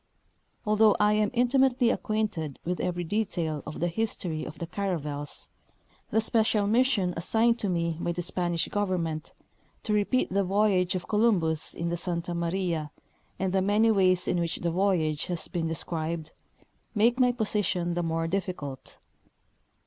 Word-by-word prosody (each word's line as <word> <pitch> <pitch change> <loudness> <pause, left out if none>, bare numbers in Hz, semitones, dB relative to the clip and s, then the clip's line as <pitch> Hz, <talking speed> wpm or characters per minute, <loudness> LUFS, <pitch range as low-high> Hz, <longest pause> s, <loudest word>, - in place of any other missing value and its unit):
Although 215 0 +5
I 210 0 +4
am 210 -1 +2
intimatel}^ 250 0 +3
acquainted 205 -10 -2
with 180 +1 -2
every 175 -1 -1
detail 170 -5 -1
of 155 - -6
the 175 - +1
history 175 -4 -2
of 155 - -8
the 170 - -4
caravels, 160 -6 -4 0.6
the 220 - +2
special 220 -2 +2
mission 220 -4 +2
assigned 230 +7 +2
to 205 - 0
me 170 -2 -1
by 170 - -1
the 175 +1 -3
Spanish 175 -1 0
government, 175 -6 -2 0.5
to 215 - -1
repeat 210 +4 +1
the 200 0 +2
voyage 190 -1 +2
of 180 - -4
Columbus 190 -8 +1
in 170 0 -2
the 170 - -1
Santa 175 0 -3
Maria 170 -2 -1 0.5
and 190 -1 -1
the 190 - +3
many 210 +4 +3
ways 185 -3 +3
in 175 - +1
which 170 0 -1
the 170 - -1
voyage 165 -5 +1
has 175 -2 -3
been 170 -3 -2
de 165 - -2
scribed, 160 -1 -3 0.6
make 230 +4 +3
my 250 -1 +5
position 205 -7 0
the 175 - -1
more 165 -1 -1
difficult. 170 -7 -4
180 Hz, 155 wpm, -28 LUFS, 170-210 Hz, 0.6 s, Although